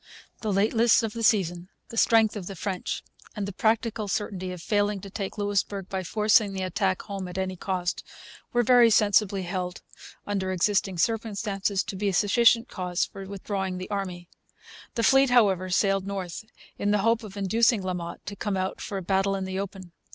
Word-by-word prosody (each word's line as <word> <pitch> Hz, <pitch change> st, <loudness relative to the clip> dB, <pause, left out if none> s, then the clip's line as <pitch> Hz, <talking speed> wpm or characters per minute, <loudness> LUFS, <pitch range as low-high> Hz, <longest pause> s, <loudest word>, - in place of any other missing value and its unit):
The 215 Hz, -, -1 dB
lateness 225 Hz, +4 st, +3 dB
of 220 Hz, -2 st, -2 dB
the 230 Hz, -, -5 dB
season, 180 Hz, -5 st, +1 dB, 0.2 s
the -, -, -9 dB
strength 225 Hz, -1 st, +4 dB
of 190 Hz, -4 st, -6 dB
the 195 Hz, -, -6 dB
French, 190 Hz, +1 st, -3 dB, 0.3 s
and 205 Hz, -2 st, -3 dB
the 200 Hz, -, -6 dB
practical 220 Hz, +1 st, 0 dB
certainty 190 Hz, -2 st, -3 dB
of 180 Hz, -, -7 dB
failing 205 Hz, +2 st, 0 dB
to 195 Hz, -, -10 dB
take 200 Hz, +2 st, -5 dB
Louisbourg 205 Hz, -1 st, -1 dB
by 190 Hz, -1 st, -2 dB
forcing 210 Hz, +2 st, +3 dB
the 190 Hz, -1 st, -3 dB
attack 185 Hz, 0 st, -1 dB
home 195 Hz, -2 st, -5 dB
at 180 Hz, +1 st, -8 dB
any 190 Hz, 0 st, -2 dB
cost, 180 Hz, -1 st, -2 dB, 0.5 s
were 240 Hz, 0 st, +2 dB
very 240 Hz, -1 st, +6 dB
sensibly 205 Hz, -2 st, +3 dB
held, 180 Hz, 0 st, -4 dB, 0.4 s
under 195 Hz, -2 st, -2 dB
existing 190 Hz, 0 st, +1 dB
circumstances, 205 Hz, -1 st, -1 dB
to -, -, -6 dB
be 200 Hz, +1 st, 0 dB
sufficient 230 Hz, +5 st, +4 dB
cause 180 Hz, -1 st, -2 dB
for 195 Hz, -1 st, -10 dB
withdrawing 195 Hz, -1 st, -3 dB
the 185 Hz, +3 st, -7 dB
army. 185 Hz, -3 st, -4 dB, 0.7 s
The 230 Hz, -, 0 dB
fleet, 270 Hz, +2 st, +5 dB
however, 195 Hz, -7 st, +3 dB
sailed 195 Hz, +1 st, +1 dB
north, 195 Hz, 0 st, -5 dB, 0.3 s
in 205 Hz, -, 0 dB
the 210 Hz, -, +3 dB
hope 230 Hz, +1 st, +3 dB
of 210 Hz, -2 st, -10 dB
inducing 220 Hz, +2 st, +2 dB
La 185 Hz, 0 st, -2 dB
Motte 170 Hz, -1 st, -6 dB
to 200 Hz, +2 st, -6 dB
come 200 Hz, -1 st, -2 dB
out 185 Hz, 0 st, -3 dB
for 200 Hz, -, -4 dB
a 190 Hz, -, -4 dB
battle 195 Hz, +2 st, +1 dB
in 190 Hz, -1 st, -3 dB
the 190 Hz, 0 st, -3 dB
open. 190 Hz, -2 st, -6 dB
195 Hz, 190 wpm, -26 LUFS, 185-215 Hz, 0.7 s, very